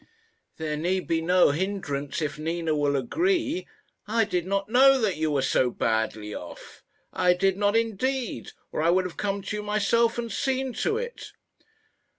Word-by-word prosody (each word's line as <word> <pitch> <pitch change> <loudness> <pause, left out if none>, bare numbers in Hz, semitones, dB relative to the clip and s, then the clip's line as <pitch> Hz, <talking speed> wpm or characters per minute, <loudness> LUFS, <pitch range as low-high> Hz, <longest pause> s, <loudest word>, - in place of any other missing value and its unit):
There 155 -1 -3
need 180 +4 -1
be 165 -1 +1
no 180 -1 +4
hindrance 150 -4 -3
if 150 0 -4
Nina 165 0 -1
will 145 -1 +1
agree. 340 - 0 0.4
I 225 +2 +2
did 180 -4 -2
not 195 0 -1
know 265 +4 +6
that 215 -6 +1
you 155 0 0
were 140 -3 +1
so 130 -1 +2
badly 110 -2 -1
off. - - -10 0.3
I 180 -1 +3
did 195 +1 +2
not 205 +1 +1
indeed, 230 +3 -1 0.2
or - - -2
I 165 - +3
would 185 +1 +3
have 180 - -6
come 200 -1 -2
to 210 +2 -4
you - - -3
myself 215 +3 +1
and 235 -1 -3
seen 265 -1 -1
to 435 - 0
it." 480 +1 -6
195 Hz, 170 wpm, -26 LUFS, 160-230 Hz, 0.4 s, know